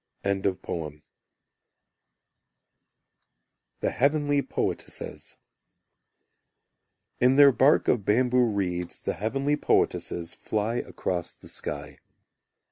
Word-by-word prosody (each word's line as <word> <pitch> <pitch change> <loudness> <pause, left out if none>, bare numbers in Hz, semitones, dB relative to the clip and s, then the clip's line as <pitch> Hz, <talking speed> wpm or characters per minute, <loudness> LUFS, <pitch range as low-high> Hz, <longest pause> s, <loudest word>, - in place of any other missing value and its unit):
The 90 -6 -2 2.9
Heavenly 145 +1 +2
Poetesses - - -4 1.8
In 125 +2 +4
their 140 0 +8
bark 135 +4 +4
of 115 -5 +2
bamboo 125 +4 +3
reeds 90 -5 -2
The - - -2
heavenly 135 +7 -1
poetesses 85 - 0
Float 110 +3 -2
across 90 -2 -3
the - - -15
sky. 75 -1 -6
110 Hz, 75 wpm, -26 LUFS, 90-135 Hz, 2.9 s, their